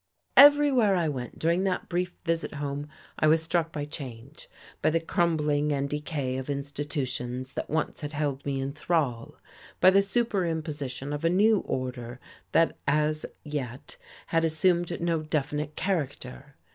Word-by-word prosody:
Everywhere 280 Hz, -7 st, +7 dB
I 170 Hz, -3 st, +1 dB
went 130 Hz, -5 st, -4 dB
during 170 Hz, +3 st, +1 dB
that 185 Hz, -1 st, -1 dB
brief 180 Hz, 0 st, -2 dB
visit 165 Hz, -2 st, -1 dB
home 145 Hz, 0 st, -4 dB, 0.3 s
I 155 Hz, -, +4 dB
was 160 Hz, +1 st, +4 dB
struck 165 Hz, 0 st, 0 dB
by 145 Hz, -2 st, -3 dB
change, 135 Hz, -2 st, -9 dB, 0.3 s
by -, -, +3 dB
the 165 Hz, +1 st, +2 dB
crumbling 150 Hz, -3 st, +1 dB
and 140 Hz, -1 st, 0 dB
decay 145 Hz, -3 st, -3 dB
of 130 Hz, -, -7 dB
institutions 140 Hz, -3 st, -4 dB
that -, -, -4 dB
once 160 Hz, +2 st, -1 dB
had 145 Hz, 0 st, -5 dB
held 145 Hz, -2 st, -2 dB
me 140 Hz, -1 st, -2 dB
in 135 Hz, +1 st, -3 dB
thrall, 140 Hz, -9 st, -1 dB, 0.4 s
by 185 Hz, -, +7 dB
the 195 Hz, +1 st, +5 dB
superimposition 160 Hz, -, -2 dB
of 145 Hz, +2 st, -4 dB
a 165 Hz, -, +4 dB
new 205 Hz, +4 st, +4 dB
order 125 Hz, -3 st, -4 dB, 0.3 s
that 165 Hz, -, +3 dB
as 150 Hz, +1 st, +1 dB, 0.2 s
yet 145 Hz, -2 st, -5 dB, 0.3 s
had 165 Hz, 0 st, +1 dB
assumed 170 Hz, +2 st, +1 dB
no 170 Hz, -2 st, 0 dB
definite 150 Hz, 0 st, -2 dB
character. 140 Hz, -6 st, -3 dB
150 Hz, 150 wpm, -27 LUFS, 140-170 Hz, 0.4 s, Everywhere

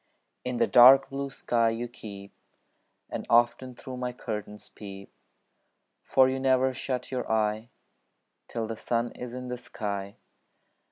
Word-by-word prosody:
In 125 Hz, -1 st, -3 dB
the -, -, +4 dB
dark 135 Hz, +3 st, +8 dB
blue 140 Hz, 0 st, -3 dB
sky 115 Hz, -3 st, +1 dB
you 115 Hz, +2 st, -3 dB
keep, 100 Hz, -4 st, -10 dB, 0.8 s
And -, -, -4 dB
often 120 Hz, +2 st, +3 dB
through 130 Hz, +1 st, -8 dB
my 125 Hz, 0 st, -3 dB
curtains 105 Hz, -3 st, -6 dB
peep; 100 Hz, -1 st, -11 dB, 0.9 s
For 130 Hz, -1 st, +4 dB
you 130 Hz, 0 st, -1 dB
never 130 Hz, 0 st, +3 dB
shut 130 Hz, 0 st, -4 dB
your 125 Hz, -3 st, -3 dB
eye 110 Hz, +1 st, 0 dB, 0.8 s
Till 115 Hz, -1 st, -3 dB
the 110 Hz, +1 st, -5 dB
sun 120 Hz, +1 st, -1 dB
is 125 Hz, 0 st, -8 dB
in 125 Hz, 0 st, -6 dB
the 125 Hz, -, -3 dB
sky. 100 Hz, -4 st, -5 dB
120 Hz, 145 wpm, -28 LUFS, 110-130 Hz, 0.9 s, dark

